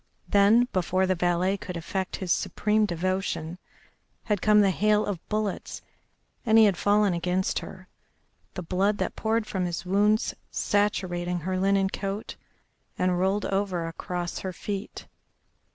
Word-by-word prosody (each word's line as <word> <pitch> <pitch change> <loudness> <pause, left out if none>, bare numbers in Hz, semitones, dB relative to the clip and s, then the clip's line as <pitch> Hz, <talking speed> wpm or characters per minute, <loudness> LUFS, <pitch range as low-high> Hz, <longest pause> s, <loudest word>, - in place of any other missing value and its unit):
Then 210 +5 +5
before 185 0 +1
the 185 - +2
valet 180 +2 +1
could 180 -2 -6
effect 190 +3 -3
his 185 -3 -3
supreme 210 +2 +1
devotion 180 -1 -2 0.6
had 210 -4 -1
come 210 -1 +5
the 195 -1 +4
hail 210 +2 +2
of 190 -5 -4
bullets, 215 -2 -3 0.6
and 225 -2 +4
he 220 - +8
had 200 -3 +3
fallen 205 0 +2
against 180 +2 0
her, 185 0 -11 0.7
the 180 - -4
blood 195 +5 +1
that - - -2
poured 220 0 0
from 190 -3 -2
his 175 +1 -4
wounds 210 +4 +2 0.2
saturating 180 -4 -1
her 185 +3 -2
linen 195 0 +2
coat, 200 +1 -4 0.6
and 180 -1 +1
rolled 195 +3 +1
over 195 -3 -1
across 175 +1 -4
her 190 - -4
feet. 195 +2 -6
190 Hz, 145 wpm, -26 LUFS, 180-205 Hz, 0.7 s, he